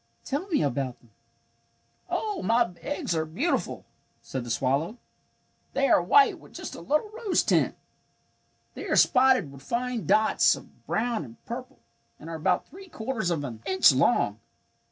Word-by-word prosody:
Tell 290 Hz, +7 st, -2 dB
me 335 Hz, -6 st, +1 dB
about 135 Hz, -2 st, -2 dB
them." 115 Hz, -, -25 dB, 1.0 s
"Oh, 420 Hz, -4 st, -2 dB
my 230 Hz, -4 st, +2 dB
eggs 290 Hz, -, -2 dB
are 160 Hz, -, +1 dB
beautiful," 210 Hz, -, -2 dB, 0.4 s
said 130 Hz, -2 st, -4 dB
the 120 Hz, -, -8 dB
swallow. 140 Hz, -, 0 dB, 0.8 s
"They -, -, +2 dB
are -, -, +5 dB
white 425 Hz, -1 st, +5 dB
with -, -, -17 dB
just -, -, -6 dB
a -, -, -8 dB
little 305 Hz, +9 st, 0 dB
rose 435 Hz, -4 st, 0 dB
tint. -, -, +2 dB, 1.0 s
They -, -, -7 dB
are -, -, +1 dB
spotted 255 Hz, -, +4 dB
with 140 Hz, -1 st, -13 dB
fine 240 Hz, -, -3 dB
dots 215 Hz, 0 st, +4 dB
of -, -, -16 dB
brown 230 Hz, -5 st, 0 dB
and 115 Hz, -4 st, -14 dB
purple, 255 Hz, +3 st, -7 dB, 0.4 s
and 160 Hz, +2 st, -9 dB
are -, -, -4 dB
about 180 Hz, +3 st, +1 dB
three 385 Hz, +1 st, -13 dB
quarters 220 Hz, -, -3 dB
of 160 Hz, -4 st, -1 dB
an 115 Hz, -5 st, -7 dB
inch 190 Hz, -4 st, +6 dB
long. 130 Hz, -, +2 dB
220 Hz, 160 wpm, -27 LUFS, -, 1.0 s, inch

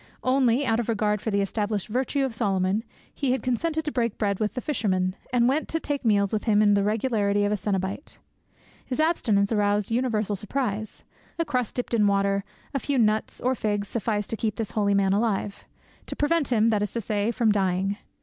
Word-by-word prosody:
Only, 255 Hz, 0 st, +3 dB
out 225 Hz, -2 st, +2 dB
of 235 Hz, -, -2 dB
regard 210 Hz, -2 st, +1 dB
for 220 Hz, -, -2 dB
the 200 Hz, -1 st, +1 dB
established 205 Hz, 0 st, -2 dB
virtue 265 Hz, +4 st, 0 dB
of 260 Hz, -, -4 dB
Solomon, 200 Hz, -2 st, 0 dB, 0.3 s
he 270 Hz, -3 st, 0 dB
had 260 Hz, -, -2 dB
consented 310 Hz, +6 st, -1 dB
to 300 Hz, -, -1 dB
break 235 Hz, -5 st, -1 dB
bread 200 Hz, -3 st, 0 dB
with 215 Hz, +2 st, -1 dB
the -, -, -1 dB
fisherman, 190 Hz, -9 st, 0 dB, 0.2 s
and 240 Hz, -1 st, +3 dB
went 280 Hz, +5 st, +1 dB
to 325 Hz, -, 0 dB
take 290 Hz, -3 st, -3 dB
meals 200 Hz, -3 st, +2 dB
with 215 Hz, -, -1 dB
him 215 Hz, -3 st, +3 dB
with 210 Hz, -1 st, +5 dB
the 200 Hz, -, +3 dB
regularity 205 Hz, -1 st, +1 dB
of 205 Hz, -, 0 dB
a -, -, +2 dB
cenobite. 195 Hz, -, -3 dB, 0.7 s
His 255 Hz, -, -4 dB
abstinence 225 Hz, -11 st, +2 dB
aroused 205 Hz, -1 st, +1 dB
universal 225 Hz, -4 st, 0 dB
surprise: 215 Hz, 0 st, -3 dB, 0.3 s
a 335 Hz, -, 0 dB
crust 250 Hz, -6 st, -2 dB
dipped 245 Hz, -1 st, -3 dB
in 210 Hz, -3 st, +4 dB
water, 200 Hz, 0 st, +1 dB, 0.3 s
a 275 Hz, -, 0 dB
few 280 Hz, +1 st, -1 dB
nuts 215 Hz, -2 st, +1 dB
or 255 Hz, +1 st, +2 dB
figs 205 Hz, -4 st, -2 dB
sufficed 210 Hz, -2 st, -2 dB
to -, -, 0 dB
keep 215 Hz, -1 st, -1 dB
this 225 Hz, -3 st, -4 dB
holy 200 Hz, -2 st, +1 dB
man 195 Hz, -1 st, +3 dB
alive—to 205 Hz, -1 st, -4 dB
prevent 300 Hz, 0 st, +1 dB
him, 225 Hz, -1 st, +4 dB
that 210 Hz, -2 st, +1 dB
is 210 Hz, -, -1 dB
to 235 Hz, -, -1 dB
say, 205 Hz, +1 st, -1 dB
from 235 Hz, -2 st, +2 dB
dying. 195 Hz, 0 st, 0 dB
215 Hz, 205 wpm, -25 LUFS, 205-250 Hz, 0.7 s, with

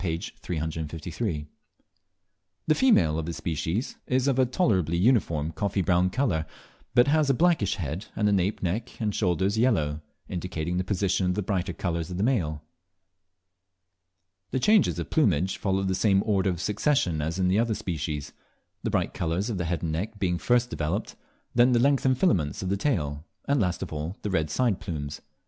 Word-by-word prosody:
353.) 80 Hz, -1 st, -4 dB, 1.2 s
The -, -, +4 dB
female 90 Hz, -, +3 dB
of 80 Hz, -, -4 dB
this 85 Hz, -, -4 dB
species 85 Hz, -, -2 dB
is 130 Hz, +1 st, +1 dB
of 135 Hz, -2 st, +2 dB
a 130 Hz, -, +4 dB
tolerably 95 Hz, -, +1 dB
uniform 85 Hz, -, +2 dB
coffee 95 Hz, +4 st, -1 dB
brown 90 Hz, +1 st, +3 dB
colour, 90 Hz, -, 0 dB, 0.5 s
but 120 Hz, +1 st, +6 dB
has 150 Hz, 0 st, +3 dB
a 135 Hz, -, +4 dB
blackish 165 Hz, -, +2 dB
head, 80 Hz, +2 st, -4 dB
and 105 Hz, -, +1 dB
the -, -, +3 dB
nape 95 Hz, +1 st, 0 dB
neck, 105 Hz, +7 st, -3 dB
and 105 Hz, -3 st, -1 dB
shoulders 95 Hz, +2 st, +1 dB
yellow, 80 Hz, -12 st, +1 dB, 0.3 s
indicating 90 Hz, -1 st, -3 dB
the 90 Hz, -, +1 dB
position 95 Hz, -1 st, 0 dB
of 90 Hz, -, +1 dB
the 105 Hz, -, -1 dB
brighter 90 Hz, -2 st, -1 dB
colours 85 Hz, -1 st, -3 dB
of 90 Hz, -, -5 dB
the 95 Hz, -, 0 dB
male. 80 Hz, -, 0 dB, 1.9 s
The 130 Hz, -, -1 dB
changes 190 Hz, -, +4 dB
of 85 Hz, -2 st, -5 dB
plumage 95 Hz, -, +2 dB
follow 95 Hz, -1 st, 0 dB
the 95 Hz, -1 st, 0 dB
same 95 Hz, 0 st, +3 dB
order 100 Hz, -3 st, +2 dB
of 90 Hz, -3 st, -2 dB
succession 100 Hz, -, +1 dB
as 80 Hz, +4 st, -2 dB
in 95 Hz, -1 st, +2 dB
the 95 Hz, +3 st, +3 dB
other 115 Hz, -1 st, +1 dB
species, 75 Hz, -5 st, -4 dB, 0.5 s
the -, -, -2 dB
bright -, -, 0 dB
colours 85 Hz, +7 st, -1 dB
of 100 Hz, -, -3 dB
the 90 Hz, -, -1 dB
head 85 Hz, +1 st, -2 dB
and 80 Hz, -, -1 dB
neck 100 Hz, +7 st, -3 dB
being 90 Hz, -3 st, 0 dB
first 125 Hz, 0 st, +2 dB
developed, 75 Hz, -1 st, -2 dB, 0.4 s
then 125 Hz, +1 st, +5 dB
the 120 Hz, -, +4 dB
lengthened 135 Hz, 0 st, +3 dB
filaments 90 Hz, -, +1 dB
of 90 Hz, -, -2 dB
the 100 Hz, -, +1 dB
tail, 75 Hz, -, -1 dB, 0.2 s
and 140 Hz, -3 st, +2 dB
last 90 Hz, -1 st, -1 dB
of 85 Hz, -, -7 dB
all, 80 Hz, +5 st, -4 dB
the 105 Hz, -, -2 dB
red 80 Hz, -4 st, 0 dB
side 115 Hz, +2 st, +1 dB
plumes. 75 Hz, -7 st, -5 dB
95 Hz, 180 wpm, -27 LUFS, 80-115 Hz, 1.9 s, but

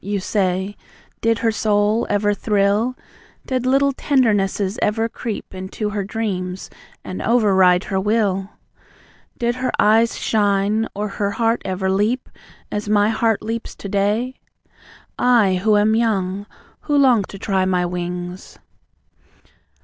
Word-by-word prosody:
you 200 Hz, 0 st, -2 dB
say. 190 Hz, 0 st, -1 dB, 0.5 s
"Did 230 Hz, 0 st, +2 dB
her 225 Hz, -, +4 dB
soul 215 Hz, +1 st, +1 dB
ever 205 Hz, 0 st, +2 dB
thrill? 205 Hz, +4 st, +1 dB, 0.5 s
Did 255 Hz, -1 st, -1 dB
little 275 Hz, +2 st, +3 dB
tendernesses 210 Hz, -7 st, +1 dB
ever 225 Hz, +2 st, +1 dB
creep 230 Hz, -3 st, -6 dB
Into 190 Hz, +3 st, -4 dB
her 205 Hz, -1 st, -2 dB
dreams, 190 Hz, -3 st, -4 dB, 0.3 s
and 185 Hz, -, -6 dB
over 225 Hz, -4 st, +3 dB
ride 180 Hz, -1 st, +4 dB
her 190 Hz, -1 st, -2 dB
will? 200 Hz, -2 st, 0 dB, 0.9 s
Did 240 Hz, 0 st, -1 dB
her 255 Hz, 0 st, -1 dB
eyes 225 Hz, +2 st, +3 dB
shine, 205 Hz, +1 st, +1 dB
or 210 Hz, +1 st, -2 dB
her 200 Hz, 0 st, -2 dB
heart 230 Hz, +2 st, 0 dB
ever 190 Hz, 0 st, -2 dB
leap 215 Hz, +6 st, 0 dB, 0.4 s
As 210 Hz, 0 st, -3 dB
my 210 Hz, 0 st, +3 dB
heart 225 Hz, -1 st, +1 dB
leaps 225 Hz, +1 st, -4 dB
to -, -, -8 dB
day? 210 Hz, +6 st, 0 dB, 0.8 s
I, 210 Hz, -7 st, +3 dB
who 215 Hz, -1 st, +4 dB
am 210 Hz, +1 st, +3 dB
young; 205 Hz, -3 st, 0 dB, 0.3 s
who 290 Hz, -1 st, 0 dB
long 255 Hz, -6 st, +5 dB
to 195 Hz, -, -10 dB
try 190 Hz, -2 st, 0 dB
my 180 Hz, -1 st, +1 dB
wings! 180 Hz, +1 st, -5 dB
210 Hz, 135 wpm, -20 LUFS, 195-225 Hz, 0.9 s, long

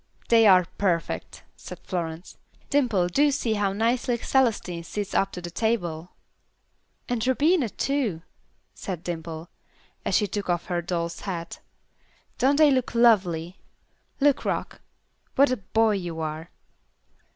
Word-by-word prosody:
"They 225 Hz, -2 st, +6 dB
are 185 Hz, -2 st, +6 dB
perfect," 175 Hz, -4 st, -1 dB
said -, -, -9 dB
Florence. 170 Hz, -2 st, -5 dB, 0.4 s
"Dimple, 235 Hz, -11 st, +2 dB
do 285 Hz, +11 st, +3 dB
see 260 Hz, -5 st, 0 dB
how 205 Hz, -2 st, 0 dB
nicely 235 Hz, +4 st, 0 dB
Celestine 225 Hz, -10 st, 0 dB
sits 205 Hz, +4 st, -5 dB
up 195 Hz, 0 st, +1 dB
to 180 Hz, -, -6 dB
the 175 Hz, 0 st, -7 dB
table." 175 Hz, -6 st, -1 dB, 1.0 s
"And 245 Hz, -1 st, -1 dB
Rubina, 285 Hz, 0 st, +3 dB
too," 230 Hz, -, -1 dB, 0.5 s
said 180 Hz, -4 st, -6 dB
Dimple, 165 Hz, -1 st, -5 dB, 0.6 s
as -, -, 0 dB
she 210 Hz, -, +3 dB
took 205 Hz, -1 st, -4 dB
off 175 Hz, -1 st, 0 dB
her 175 Hz, -1 st, -1 dB
doll's 170 Hz, -1 st, -3 dB
hat. 170 Hz, -4 st, -5 dB, 0.8 s
"Don't 275 Hz, +3 st, +4 dB
they 300 Hz, -1 st, +6 dB
look 255 Hz, -2 st, 0 dB
lovely? 185 Hz, -7 st, +3 dB, 0.6 s
Look, 285 Hz, -1 st, +3 dB
Rock. -, -, -3 dB, 0.5 s
What 280 Hz, 0 st, +5 dB
a 255 Hz, -, 0 dB
boy 220 Hz, +3 st, +1 dB
you 175 Hz, -5 st, -3 dB
are." 160 Hz, +1 st, -4 dB
195 Hz, 135 wpm, -25 LUFS, 175-240 Hz, 1.0 s, They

